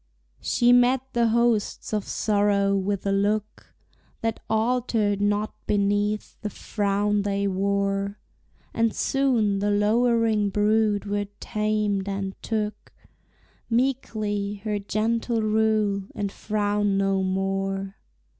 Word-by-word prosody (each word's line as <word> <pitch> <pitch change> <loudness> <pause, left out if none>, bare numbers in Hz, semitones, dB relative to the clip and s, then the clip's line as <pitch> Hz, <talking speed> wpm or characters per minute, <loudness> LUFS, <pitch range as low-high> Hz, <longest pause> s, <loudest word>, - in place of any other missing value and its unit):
She 240 0 +3
met 245 +1 +4
the 235 -1 +3
hosts 230 -2 +1
of 210 -2 -1
sorrow 200 -1 +1
with 195 0 -1
a 200 - +1
look 205 +2 -1 0.5
That 225 -1 -1
altered 220 -3 +1
not 205 +1 0
beneath 205 +1 0
the 210 - -3
frown 205 0 0
they 200 0 -1
wore, 200 +1 -1 0.6
And 230 -1 +1
soon 235 -7 +1
the 205 +1 0
lowering 220 0 +2
brood 210 0 +2
were 205 0 -2
tamed, 210 -2 -1
and 195 -1 -3
took, 215 -2 -3 0.8
Meekly, 215 -5 -1
her 210 -2 -1
gentle 225 +3 -1
rule, 215 -2 +1
and 200 -1 -2
frowned 205 -1 0
no 195 -1 +1
more. 195 +1 -2
205 Hz, 110 wpm, -25 LUFS, 200-220 Hz, 0.8 s, met